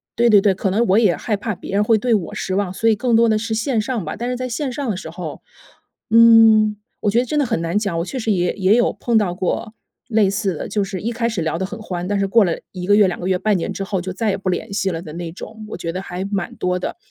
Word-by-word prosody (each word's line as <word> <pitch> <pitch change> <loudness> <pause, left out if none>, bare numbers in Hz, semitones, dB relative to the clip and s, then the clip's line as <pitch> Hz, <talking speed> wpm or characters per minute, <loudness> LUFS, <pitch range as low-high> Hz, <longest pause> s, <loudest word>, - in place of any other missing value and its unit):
对 235 +1 +3
对 205 -2 +7
对， 195 -1 +3
可 190 - -1
能 225 +5 +2
我 190 - +4
也 205 -7 +3
害 210 -3 -2
怕 215 +2 -3
别 190 - -8
人 205 +1 +3
会 220 +1 +3
对 240 +2 +1
我 190 -5 -3
失 185 - -3
望， 195 -2 -1
所 225 +4 +1
以 220 - +4
更 235 +2 +1
多 230 0 +4
的 215 - +3
是 225 +1 -3
线 225 +2 0
上 230 -2 -3
吧。 155 - -4
但 240 +1 -4
是 250 - -1
在 255 0 -4
线 260 +2 -3
上 275 -1 -3
的 200 - -1
时 185 - -7
候， 170 -3 -7 0.7
嗯， 225 -2 +6 0.2
我 205 - +1
觉 230 - +3
得 250 - 0
真 300 +5 -2
的 285 - +2
很 225 -8 -1
难 170 +4 -1
讲， 200 -6 -2
我 170 - -2
确 265 - -6
实 220 -2 0
也 180 -2 +1
也 195 +1 +3
有 240 - +3
碰 235 -2 0
到 200 -5 +1
过 195 +4 -2 0.4
类 215 -4 +3
似 195 -1 -1
的， - - -6
就 205 - 0
是 195 -1 -5
一 230 - -2
开 230 0 -1
始 215 -6 -3
聊 160 0 -1
得 190 - -2
很 220 +3 -8
欢， 180 -4 -4
但 205 0 0
是 195 - +1
过 220 +2 +5
了 170 - 0 0.2
1 180 -2 -6
个 205 - +5
月、 205 -2 +5
2 180 - -3
个 180 - -4
月、 185 -1 +1
半 210 -1 +1
年 170 - -3
之 195 - -4
后， 195 -1 -2
就 185 +1 -5
再 215 +3 -1
也 195 - 0
不 190 -1 -3
联 180 +2 -3
系 195 -1 0
了 165 -1 -4
的 160 - -9
那 170 0 -5
种， 215 +4 -9
我 - - -5
觉 165 - -4
得 180 - -4
还 180 -1 -5
蛮 195 -3 -3
多 180 0 0
的。 - - -5
205 Hz, 325 characters per minute, -20 LUFS, 185-225 Hz, 0.7 s, 对